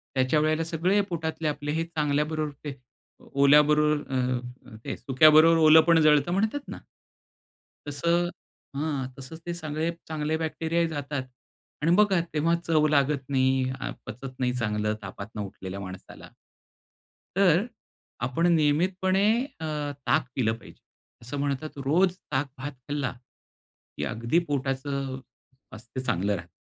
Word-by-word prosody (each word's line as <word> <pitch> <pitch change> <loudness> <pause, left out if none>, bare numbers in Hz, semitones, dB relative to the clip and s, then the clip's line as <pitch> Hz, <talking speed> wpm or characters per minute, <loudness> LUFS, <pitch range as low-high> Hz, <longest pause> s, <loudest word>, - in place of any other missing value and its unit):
त्याच्या 130 +3 +2
वेळेला 155 +1 +1
सगळे 170 +5 +1
पोटातले 160 -1 -3
आपले 145 0 -2
हे 160 +2 0
चांगल्याबरोबर 150 -1 -1
ते 145 -2 -4 0.6
ओल्याबरोबर 150 +2 +4
अ, 125 -1 0 0.4
काय, - - -4
सुक्याबरोबर 155 +4 +6
ओलं 155 0 +8
पण 165 -1 +6
जळतं 150 +1 +4
म्हणतात 220 +9 -1
ना? - - -7 1.1
तसं, 170 +4 +1 0.5
हां. 145 -3 -2
तसंच 135 +5 -9
ते 175 - -2
सगळे 155 0 -2 0.2
चांगले 155 0 -1
बॅक्टेरियाही 165 +1 -1
जातात, 145 -3 -3 0.6
आणि 165 - +3
बघा 200 -4 +4
तेव्हा 165 +3 +2
चव 155 -2 +3
लागत 140 -2 +1
नाही, 130 -1 +2 0.4
पचत 125 +2 -7
नाही 125 -1 +1
चांगलं 105 0 0
तापातनं 100 +2 -7
उठलेल्या 95 -1 -7
माणसाला. 95 -1 -10 1.1
तर, 195 +1 +4 0.6
आपण 155 +7 0
नियमितपणे 180 +5 +2 0.4
अ, - - -4 0.4
ताक 155 -4 +2
पिलं 110 -4 +2
पाहिजे. - - -16 0.4
असं 125 +5 -6
म्हणतात 145 +1 -3
रोज 180 +6 +3 0.2
ताक 135 +1 +1
भात 140 +2 -5 0.2
खाल्ला, 145 -3 -1 0.8
की - - -2
अगदी 115 +8 0
पोटाचं 135 -1 -2
स्वास्थ 125 -1 -14
चांगलं 105 -6 0
राहतं. 85 0 -9
150 Hz, 125 wpm, -26 LUFS, 130-160 Hz, 1.1 s, ओलं